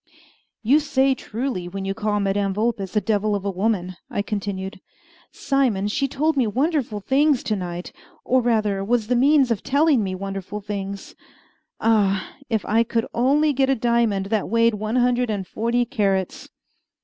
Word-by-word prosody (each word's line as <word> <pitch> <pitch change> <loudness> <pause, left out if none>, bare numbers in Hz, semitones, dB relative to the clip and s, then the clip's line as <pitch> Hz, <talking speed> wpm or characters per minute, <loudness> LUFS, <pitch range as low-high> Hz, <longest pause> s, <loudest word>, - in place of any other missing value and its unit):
"You 270 +7 +5
say 275 -3 +2
truly 235 -6 -4
when 195 +2 -5
you 195 - -1
call 210 +1 -1
Madame 195 -1 0
Vulpes 210 -3 -2
a 210 - +3
devil 210 -1 0
of 200 -1 -4
a 200 - 0
woman," 185 -2 -1
I 200 - -2
continued. 195 -2 -4 0.5
"Simon, 260 -8 0
she 275 +6 0
told 300 +4 0
me 255 -5 +2
wonderful 255 -3 -1
things 275 +3 +2
to 215 - -1
night, 180 -2 -5 0.3
or 255 0 +3
rather 215 -5 +1
was 230 +1 +1
the 250 - +3
means 270 0 +4
of 215 - 0
telling 285 -4 +2
me 190 -1 -3
wonderful 195 +1 -5
things. 200 -1 -6 0.7
Ah! 200 -4 +1 0.2
if 220 -4 -1
I 220 +2 +3
could 230 0 -1
only 285 +5 +3
get 270 0 +1
a 270 - +3
diamond 230 -4 +1
that 215 -3 0
weighed 230 0 +3
one 215 +2 -3
hundred 245 -1 +2
and 200 -3 -2
forty 235 +5 0
carats!" 195 -5 -1
220 Hz, 170 wpm, -22 LUFS, 195-250 Hz, 0.7 s, You